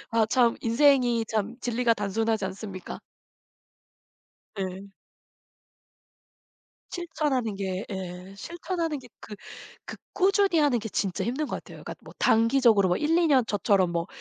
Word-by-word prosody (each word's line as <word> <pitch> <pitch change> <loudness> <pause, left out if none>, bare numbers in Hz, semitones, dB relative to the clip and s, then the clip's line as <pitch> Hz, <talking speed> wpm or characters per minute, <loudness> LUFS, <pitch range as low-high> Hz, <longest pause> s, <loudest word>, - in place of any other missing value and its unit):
아 225 -1 +2
참 235 0 +3
인생이 240 -1 +3
참 220 +2 -2
진리가 240 -1 +1
단순하지 220 0 -1
않습니까? 190 -1 -7 1.6
네. 195 +1 -5 2.0
실천하는 290 - -2
게 190 0 -3
예 185 0 -7
실천하는 335 - -3
게 250 -1 -14
그 210 - -9 0.5
그 - - -7 0.2
꾸준히 390 -2 +3
하는 285 -5 +3
게 220 0 -5
진짜 190 -2 -2
힘든 270 +6 -2
것 - - -3
같아요. - - -11
그러니까 - - -6
뭐 - - -13
단기적으로 225 -4 +4
뭐 180 - +2
1-2 330 +3 +2
년 265 -5 +4
저처럼 200 -3 +2
뭐 170 +1 -1
230 Hz, 260 characters per minute, -26 LUFS, 195-275 Hz, 2.0 s, 단기적으로